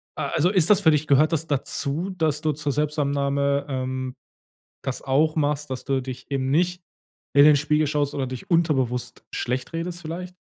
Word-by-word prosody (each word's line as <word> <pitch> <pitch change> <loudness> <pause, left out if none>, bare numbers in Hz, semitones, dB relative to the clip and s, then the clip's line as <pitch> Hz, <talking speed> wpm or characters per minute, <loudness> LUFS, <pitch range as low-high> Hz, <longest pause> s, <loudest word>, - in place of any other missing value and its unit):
Äh, - - -4
also 165 +3 +3
ist 185 -4 +4
das 210 -2 +6
für 160 - +5
dich 150 0 +1
gehört 150 +3 +4
das 160 0 -1
dazu, 145 +5 -2
dass 160 -5 -1
du 155 -1 +1
zur 145 0 -2
Selbstannahme, 140 -1 0
ähm, 130 -1 -3 0.7
das 135 -2 -4
auch 150 +4 +2
machst, 150 -1 0
dass 130 - -5
du 135 -1 0
dich 130 +1 -8
eben 135 -1 -1
nicht 180 +4 +1 0.5
in 140 - +8
den 150 -1 +7
Spiegel 150 +2 +1
schaust 145 -1 -1
oder 135 -2 -1
dich 130 -1 -7
unterbewusst 135 -8 0
schlecht 125 +6 -3
redest 170 +1 -4
vielleicht? 175 +3 -6
145 Hz, 185 wpm, -24 LUFS, 135-160 Hz, 0.7 s, in